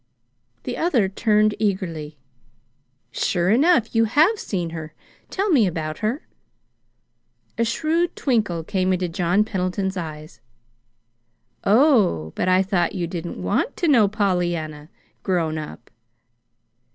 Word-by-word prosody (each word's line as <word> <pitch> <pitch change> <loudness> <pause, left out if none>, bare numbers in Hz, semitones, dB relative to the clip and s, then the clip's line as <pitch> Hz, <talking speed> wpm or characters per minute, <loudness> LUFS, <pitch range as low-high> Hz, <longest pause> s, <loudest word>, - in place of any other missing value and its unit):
The - - -4
other 270 - +2
turned 210 +2 +2
eagerly. 170 -8 -2 0.9
"Sure 180 0 0
enough, 260 -1 +3
you 225 -1 +3
have 315 - +3
seen 175 -5 -3
her! 155 -1 -8 0.3
Tell 395 +1 -1
me 245 - +4
about 155 -3 -4
her." 225 +8 -2 1.3
A - - +4
shrewd 325 +8 0
twinkle 210 - 0
came 185 +2 0
into 180 0 -1
John 175 +4 +1
Pendleton's 190 -1 -2
eyes. 155 -5 -7 1.2
"Oh, 205 - +3
but 185 - 0
I 185 +1 +4
thought 190 -1 0
you 175 -2 -1
didn't 170 - -6
want 90 - -1
to 345 - 0
know 235 -9 +5
Pollyanna 175 -7 -2 0.3
grown 165 -4 -1
up." 150 -5 -10
190 Hz, 120 wpm, -22 LUFS, 170-225 Hz, 1.3 s, know